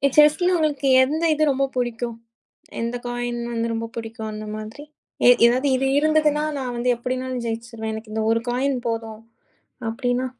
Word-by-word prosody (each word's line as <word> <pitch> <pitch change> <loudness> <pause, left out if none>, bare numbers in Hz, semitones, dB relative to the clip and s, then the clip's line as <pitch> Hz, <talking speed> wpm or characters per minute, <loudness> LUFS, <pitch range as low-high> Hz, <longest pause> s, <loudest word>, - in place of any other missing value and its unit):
செஸ்ல 305 +5 +5
உங்களுக்கு 290 -4 0
எந்த 305 +5 +1
இது 310 0 +1
ரொம்ப 275 0 +2
புடிக்கும், 240 -1 -2 0.6
எந்த 235 +1 -2
காய்ன் 240 0 -3
வந்து 230 0 -1
ரொம்ப 230 0 -3
புடிக்கும் 225 -1 -6
அந்த 215 0 -6
மாதிரி. 215 +7 -8 0.6
எதாது 255 +4 +2
இது 270 +1 +1
இருந்ததுன்னா 305 0 +3
நான் 250 -2 -3
வந்து 245 +1 0
எப்படின்னாலும் 255 0 -3
ஜெயிச்சுருவேன். 225 -1 -4
எனக்கு 220 0 -8
இந்த 220 0 -1
ஒரு 230 0 +2
காய்ன் 260 +2 0
போதும் 225 -1 -4 0.7
அப்படின்னா? 245 +1 -1
245 Hz, 150 wpm, -23 LUFS, 230-275 Hz, 0.7 s, செஸ்ல